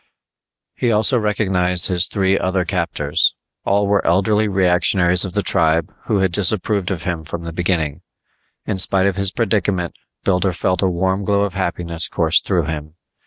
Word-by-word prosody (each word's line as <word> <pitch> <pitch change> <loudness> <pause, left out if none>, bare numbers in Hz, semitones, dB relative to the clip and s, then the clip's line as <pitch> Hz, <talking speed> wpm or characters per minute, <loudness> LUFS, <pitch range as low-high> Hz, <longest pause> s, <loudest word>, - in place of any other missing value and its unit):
He 120 - -1
also 110 +3 +2
recognized 95 -4 0
his 90 -2 +1
three 95 -1 +1
other 95 -1 0
captors; 85 -6 0 0.3
all 100 +1 +2
were 100 0 +1
elderly 105 +4 +2
reactionaries 90 -1 +3
of 90 - -6
the - - 0
tribe 80 +2 +1
who 105 - +1
had 95 -2 +1
disapproved 100 +1 +1
of 90 -4 -4
him 85 -4 -3
from 85 +2 -6
the 85 0 -6
beginning. 85 -4 -1 0.6
In 100 -3 -2
spite 95 0 +2
of 100 -2 +1
his 100 0 +1
predicament 100 -6 -1 0.3
Builder 95 -1 +1
felt 90 +2 -1
a 95 - +2
warm 95 +2 -1
glow 100 0 +1
of 100 -2 -1
happiness 85 -3 -3
course 80 0 +2
through 90 -4 0
him. 75 0 -6
95 Hz, 165 wpm, -19 LUFS, 85-100 Hz, 0.6 s, reactionaries